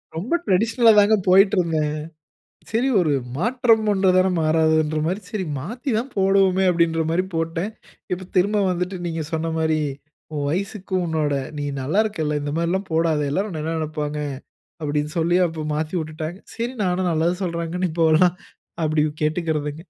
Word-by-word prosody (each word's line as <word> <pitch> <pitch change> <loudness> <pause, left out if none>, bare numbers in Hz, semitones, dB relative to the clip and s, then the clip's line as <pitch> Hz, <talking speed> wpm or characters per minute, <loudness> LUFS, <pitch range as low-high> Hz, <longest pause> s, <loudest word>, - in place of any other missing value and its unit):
ரொம்ப 195 - -3
டிரடிஷனல்ல 225 +5 +4
தாங்க 205 +2 +5
போயிட்டிருந்தேன். 180 -6 +3 0.8
சரி 235 +5 +1
ஒரு 155 -5 +2 0.2
மாற்றம் 230 - +2
ஒன்று 190 -1 +3
தானே 185 +1 +4
மாறாதுன்ற 155 -1 +2
மாரி, 190 +5 -1
சரி 210 -4 -2
மாத்தி 240 - -5
தான் 255 +4 -4
போடுவோமே 190 -1 +3
அப்படின்ற 170 -1 +1
மாரி 175 +3 +1
போட்டேன். 165 +5 -2 0.4
இப்ப 180 0 -3
திரும்ப 205 +3 +3
வந்துட்டு 180 +2 -2
நீங்க 165 -1 -3
சொன்ன 165 0 -1
மாரி, 160 -1 +1 0.5
"உன் 145 -2 -2
வயசுக்கு, 190 +3 -3
உன்னோட 155 -2 0 0.3
நீ 145 - -2 0.2
நல்லா 150 +11 +1
இருக்கல்ல! 155 -8 -1
இந்த 145 - -3
மாரிலாம் 185 +4 -1
போடாத. 160 -2 +2
எல்லோரும் 195 +8 -1
உன்னை 155 -2 -4
என்ன 165 +1 -2
நினைப்பாங்க?" 150 -1 -3 0.6
அப்படின்னு 150 0 -1
சொல்லி 170 +2 +2
அப்ப 160 -2 -5
மாத்தி 155 +3 -3
விட்டுட்டாங்க. 155 +2 -5 0.2
சரி 235 +2 -3
நானும் 180 0 0
நல்லது 165 +2 +1
சொல்றாங்கன்னு 170 +1 -2
இப்போலாம் 165 +2 +4 0.5
அப்படி 155 -1 +2 0.2
கேட்டுக்கிறதுங்க. 155 -1 -2
170 Hz, 150 wpm, -22 LUFS, 155-190 Hz, 0.8 s, தாங்க